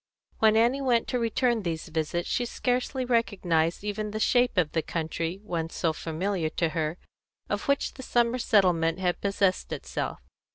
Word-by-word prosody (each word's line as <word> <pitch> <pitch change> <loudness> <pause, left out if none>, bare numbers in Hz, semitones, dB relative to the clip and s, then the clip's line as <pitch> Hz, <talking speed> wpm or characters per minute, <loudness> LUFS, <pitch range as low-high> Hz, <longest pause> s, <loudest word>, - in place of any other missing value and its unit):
When 220 -1 +5
Annie 240 +5 +3
went 245 -4 +2
to 250 - 0
return 235 0 +1
these 165 -3 -4
visits 160 +2 -2
she 245 - 0
scarcely 250 +2 -1
recognised 185 -9 +1
even 210 +1 -3
the 215 +1 -4
shape 245 0 +3
of 160 -4 +2
the 160 - +1
country, 165 +2 -3
once 165 -5 -3
so 165 -2 +1
familiar 165 +1 -2
to 165 +1 0
her, 155 0 -2 0.5
of - - -2
which 280 0 +1
the - - -9
summer 240 -1 +1
settlement 180 -7 +3
had 180 -2 -1
possessed 195 -1 +1
itself. - - -3
195 Hz, 165 wpm, -27 LUFS, 165-235 Hz, 0.5 s, When